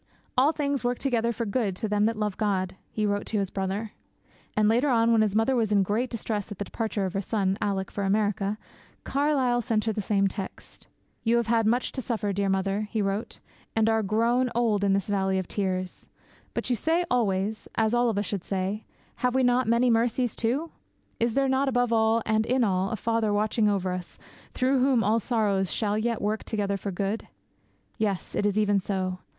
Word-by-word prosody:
'All 270 +4 +4
things 285 -4 -1
work 245 0 0
together 235 -4 0
for 230 0 -3
good 205 -2 -1
to 220 +4 -2
them 210 0 +2
that 225 0 0
love 210 -2 -1
God,' 190 -4 -1
he 215 - -1
wrote 205 0 -1
to 220 - -1
his 195 -2 -1
brother. 195 +3 -3 0.7
And, 215 -1 +4
later 240 +6 +3
on, 230 -2 +3
when 225 -1 +4
his 210 -2 +1
mother 225 +4 +3
was 225 -3 +1
in 200 -2 +4
great 220 +6 -1
distress 215 -3 -3
at 205 - -6
the 205 - -3
departure 220 -3 -2
of 185 - -3
her 195 - -1
son, 195 -2 0
Alick, 195 -2 -1
for 200 - -3
America, 205 0 0 0.5
Carlyle 270 -4 +1
sent 225 -3 0
her 220 - 0
the 210 - -2
same 195 0 +2
text. 195 0 -8 0.4
'You 235 +1 +3
have 235 - +1
had 225 -1 +2
much 245 +3 +1
to 260 - -4
suffer, 220 -4 -2
dear 200 0 0
mother,' 195 +2 0
he 220 - -2
wrote, 200 +2 -2 0.4
'and 225 0 +3
are 225 0 +3
grown 230 +5 +2
old 220 -4 +2
in 195 -1 +3
this 195 -1 0
Valley 190 -2 +1
of 185 -2 -2
Tears; 185 -2 -3 0.5
but - - -2
you - - +3
say 330 - +1
always, 210 -3 0
as 220 0 +2
all 240 0 +3
of 215 - -2
us 205 - 0
should 195 -3 -3
say, 195 +2 -2 0.3
"Have 250 0 0
we 260 - +3
not 245 -1 +3
many 235 +2 +3
mercies 235 +1 +1
too?" 270 +8 -1 0.5
Is 230 -1 +1
there 275 0 +3
not 265 +1 +2
above 245 -2 +1
all, 225 0 +3
and 220 0 +2
in 255 +1 +2
all, 190 -2 +1
a 225 - -2
Father 225 0 0
watching 210 +1 +2
over 190 -2 0
us, 180 -1 -6 0.4
through 260 +1 +2
whom 255 -3 +3
all 220 +2 +3
sorrows 205 -5 0
shall 210 -2 0
yet 230 +1 -1
work 215 +1 -1
together 200 -2 -1
for 195 +1 -4
good? 195 +4 -2 0.7
Yes, 205 -4 -1
it 205 - +1
is 205 0 -1
even 205 -2 +3
so. 185 -1 -2
215 Hz, 210 wpm, -27 LUFS, 200-235 Hz, 0.7 s, All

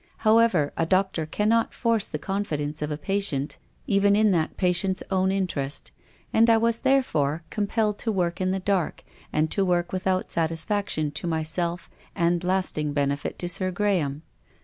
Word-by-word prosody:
However, 215 -9 +4
a 165 - +1
doctor 185 -3 +1
cannot 215 +7 +1
force 230 -4 +1
the - - -4
confidence 155 -7 -3
of 150 - -1
a 150 - -3
patient 155 -5 -2 0.3
even 200 0 +3
in 215 0 +4
that 165 -4 0
patient's 185 +1 +1
own 190 0 +2
interest, 175 -7 -2 0.4
and 230 +1 +5
I 225 - +6
was, 230 0 +1
therefore, 165 - +1
compelled 210 0 0
to 225 - -1
work 180 -2 -1
in 185 - +1
the 190 +1 0
dark, 190 -3 -1 0.3
and 155 +1 +1
to 195 - +1
work 175 -1 0
without 185 0 -1
satisfaction 165 -1 0
to 150 +4 -4
myself 170 +2 -2 0.3
and 170 -1 +1
lasting 180 -5 0
benefit 140 0 -1
to 175 - -3
Sir 185 +2 -2
Graham. 175 -7 0
185 Hz, 160 wpm, -25 LUFS, 160-200 Hz, 0.4 s, I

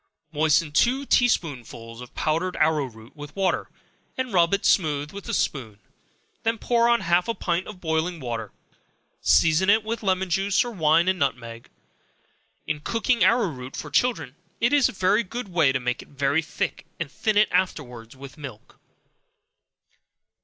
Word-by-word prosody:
Moisten 155 0 +2
two 250 - +2
tea 245 -2 +4
spoonsful 120 - -4
of 125 - -12
powdered 165 +4 -1
arrow 155 -2 +2
root 115 +1 -14
with 145 -1 -10
water, 195 -1 0 0.5
and 255 -4 -3
rub 170 -2 +4
it 200 0 0
smooth 150 -5 +2
with 200 0 -9
a - - -2
spoon; 110 -8 -2 0.6
then 225 0 0
pour 235 +1 +2
on 235 0 +3
half 175 +1 +2
a 230 - -1
pint 175 +1 -2
of 210 -3 -9
boiling 165 +1 -1
water; 115 -5 -5 0.7
season 165 +4 +4
it 215 +1 +4
with 225 +1 -4
lemon 190 -2 0
juice, 195 +5 +1
or 240 - -5
wine 165 -3 +3
and 185 -1 +1
nutmeg. 120 -4 -3 1.0
In 150 - -2
cooking 230 +5 0
arrow 200 +2 +3
root 130 -3 -8
for 150 - -7
children, 245 - 0 0.2
it 235 +5 +2
is 285 -3 +4
a - - -5
very 195 +4 +2
good 230 +2 -6
way 165 -6 +3
to 130 - -1
make 125 0 -2
it - - -15
very 140 +2 0
thick, 160 - -4
and 160 -4 -4
thin 215 +5 -1
it 210 - +5
afterwards 130 -10 -2
with 135 +1 -12
milk. 130 -7 -11
165 Hz, 170 wpm, -24 LUFS, 140-200 Hz, 1.0 s, it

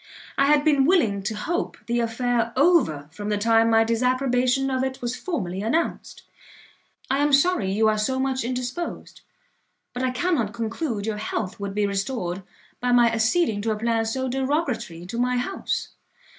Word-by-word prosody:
I 275 - +3
had 295 0 +4
been 285 -3 +4
willing 235 - +3
to 215 +3 -3
hope 325 +12 -2
the 240 0 0
affair 235 0 0
over 260 - +3
from 205 +4 -6
the 210 - +1
time 225 +2 +3
my 225 0 +5
disapprobation 255 +3 +1
of 260 0 0
it 265 0 -3
was 245 0 -3
formally 195 - -3
announced. 285 +11 -2 0.9
I 270 - +2
am 290 0 +2
sorry 280 - +3
you 220 +3 +2
are 215 0 +2
so 260 +5 0
much 265 -1 0
indisposed, 250 +7 -4 0.7
but 245 - -4
I 260 - +1
cannot 255 - 0
conclude 230 -1 -3
your 220 -1 -2
health 210 -2 -4
would 200 -1 -5
be 210 0 +2
restored 195 -2 -2 0.4
by 250 0 0
my 240 -1 +5
acceding 225 0 +1
to 225 - -2
a - - -4
plan 225 0 +1
so 260 +4 -2
derogatory 260 - -2
to 230 +6 -5
my 250 0 +1
house. 315 +11 -2
240 Hz, 170 wpm, -24 LUFS, 215-265 Hz, 0.9 s, my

